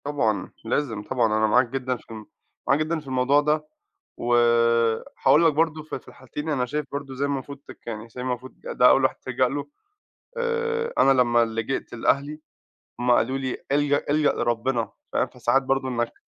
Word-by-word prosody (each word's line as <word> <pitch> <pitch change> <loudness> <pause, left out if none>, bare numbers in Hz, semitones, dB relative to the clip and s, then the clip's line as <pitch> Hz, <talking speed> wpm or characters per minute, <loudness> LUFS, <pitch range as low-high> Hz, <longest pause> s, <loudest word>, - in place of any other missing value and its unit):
طبعًا. 110 -9 -1
لازم 115 -3 -1
طبعًا، 125 +2 0
أنا 110 0 +2
معاك 125 +3 +3
جدًا 130 0 -2
في - - -18
ال 110 -1 -8 0.4
معاك 140 - +3
جدًا 160 +1 -1
في 150 - -15
الموضوع 130 +2 +3
ده، 150 +1 0 0.5
و 120 0 +1 0.9
هاقول 150 +5 +6
لك 160 - +4
برضه 155 0 0
في 155 - -6
في - - -28
الحالتين 150 +4 -7
أنا 130 -5 0
شايف 150 +3 -3
برضه 140 -1 -5
إزاي 135 +2 -1
المفروض 140 0 -4
تك - - -14
يعني 110 -1 -5
إزاي 120 +2 -8
المفروض 125 0 -4
ده 125 - +4
أول 135 - +4
واحد 130 - +2
تلجأ 130 0 0
له. 140 +2 -4 0.7
آآ 465 0 -1
أنا 135 - +5
لمّا 120 -1 +3
لجأت 115 +4 -3
لأهلي، 140 +5 0 0.6
هم 125 0 +2
قالوا 130 +2 +2
لي: 130 -2 -3
"الجَأ 145 0 +2
الجَأ 150 0 +3
لربِّنا." 120 -1 -1 0.2
فاهم، - - +1
فساعات 135 +3 +1
برضه 135 0 0
إنّك 120 -2 -2
130 Hz, 180 wpm, -24 LUFS, 120-145 Hz, 0.9 s, هاقول